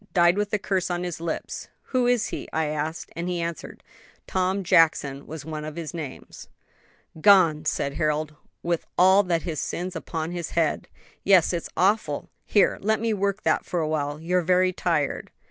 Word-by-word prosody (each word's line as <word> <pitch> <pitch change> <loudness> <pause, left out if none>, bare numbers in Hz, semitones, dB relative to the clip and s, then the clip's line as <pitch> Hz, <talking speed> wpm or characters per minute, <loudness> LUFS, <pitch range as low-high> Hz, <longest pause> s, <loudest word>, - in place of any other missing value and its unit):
died 175 0 +5
with 205 0 -1
a 210 - +2
curse 190 -2 -1
on 175 0 -2
his 175 -2 -5
lips.' 165 -1 -4 0.3
'Who 250 -1 +3
is 245 -2 +2
he?' - - -6
I 160 0 0
asked; 155 +2 -3
and 170 +2 -3
he 175 -1 -2
answered, 170 -1 -5 0.4
'Tom 190 +1 0
Jackson 150 -5 +3
was 155 -1 -7
one 155 -1 -5
of 155 0 -6
his 165 -1 -6
names.'" 155 -5 -8 0.7
"Gone!" 170 -6 +5
said 140 -2 -1
Harold, 155 -1 0
"and 150 - -24 0.3
with 170 -1 -1
all 190 +2 +6
his 165 -3 -1
sins 180 +1 -4
upon 160 0 -4
his 175 -2 -4
head." 160 -3 +1 0.4
"Yes; 185 -3 +5
it's 170 - -3
awful! 185 -6 +1 0.2
Here, 205 - +3
let 220 +2 +1
me 225 0 0
work 200 0 -1
that - - +2
for 175 - -2
awhile. 150 -2 -1
You're 180 +3 +1
very 185 +1 +3
tired." 160 -6 -1
170 Hz, 180 wpm, -25 LUFS, 155-185 Hz, 0.7 s, all